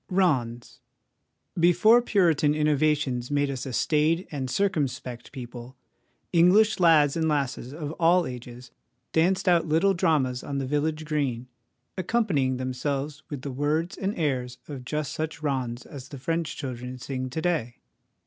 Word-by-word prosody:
'Rond.es.' 130 - 0 0.8
Before 180 +8 +5
Puritan 165 - +2
innovations 150 -4 +1
made 145 -1 +1
us 135 0 -5
a - - -4
staid 155 +6 +1
and 135 -4 -3
circumspect 140 - -2
people, 125 -1 -9 0.6
English 190 +6 +5
lads 155 -5 +5
and 160 -1 +1
lasses 135 -4 -1
of 150 0 -5
all 175 +1 +4
ages 125 0 -9 0.4
danced 185 +4 +2
out 170 -2 +4
little 165 +6 +3
dramas 135 -8 +1
on 140 - -4
the 135 - -1
village 155 +3 -1
green, 135 -6 -2 0.5
accompanying 175 - +1
themselves 135 +3 -3
with 140 -3 -6
the 140 - -4
words 150 +6 -1
and 195 +2 -3
airs 130 -6 -1
of 135 -4 -7
just 150 +2 -2
such 155 -1 -4
rondes 130 -4 -2
as 135 -3 -10
the 140 - -8
French 165 +4 -2
children 125 -2 -6
sing 130 0 -4
to 140 - -4
day. 160 -9 -1
145 Hz, 145 wpm, -26 LUFS, 130-165 Hz, 0.8 s, Before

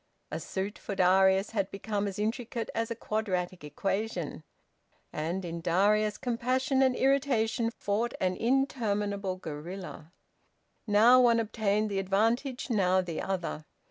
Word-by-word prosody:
A - - -3
suit, 195 +2 -4
for 200 - -5
Darius, 190 +1 +4
had 200 -4 -1
become 205 0 -3
as 195 - -5
intricate 230 +2 -3
as 230 0 -1
a 230 - -3
quadratic 185 -6 -2
equation. 180 +1 -3 0.7
And, 170 +5 -3
in 170 0 -4
Edwin, 205 +5 +3
compassion 255 +3 0
and 260 -1 +3
irritation 255 -4 +1
fought 230 +1 -2
an 185 -1 0
interminable 210 -6 0
guerilla. 170 0 -8 0.8
Now 225 +5 +6
one 235 -2 +5
obtained 215 -1 0
the 195 - 0
advantage, 225 +7 0
now 185 -3 +3
the 170 -3 -4
other. 180 -5 -3
205 Hz, 130 wpm, -29 LUFS, 185-230 Hz, 0.8 s, Now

